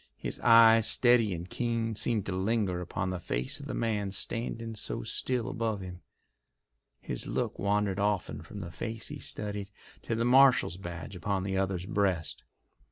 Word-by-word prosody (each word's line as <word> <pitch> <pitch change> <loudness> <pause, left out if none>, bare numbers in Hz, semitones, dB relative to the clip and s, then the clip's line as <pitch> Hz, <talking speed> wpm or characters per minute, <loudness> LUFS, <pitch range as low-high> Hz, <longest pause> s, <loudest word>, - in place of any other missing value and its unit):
His - - -3
eyes, 115 -1 +7
steady 120 -4 +4
and 85 0 -5
keen, 115 +1 -2
seemed 110 -1 0
to - - -3
linger 95 -1 0
upon 90 +1 -3
the 90 - -3
face 65 -7 -2
of - - -8
the - - -4
man 105 -4 -1
standing 115 +3 -2
so 105 - -4
still 125 - -2
above 110 -3 -2
him. 90 -1 -8 1.0
His - - -4
look - - -2
wandered 100 0 +1
often 100 -2 -1
from 105 - -9
the 85 -2 -7
face 115 +5 -5
he 145 -1 -7
studied 105 -4 -4 0.3
to 115 - -2
the 115 +1 0
marshal's 130 -7 +5
badge 85 -1 -7
upon 95 +1 -2
the 95 0 -2
other's 95 -2 -1
breast. 95 -6 -1
105 Hz, 165 wpm, -30 LUFS, 95-115 Hz, 1.0 s, eyes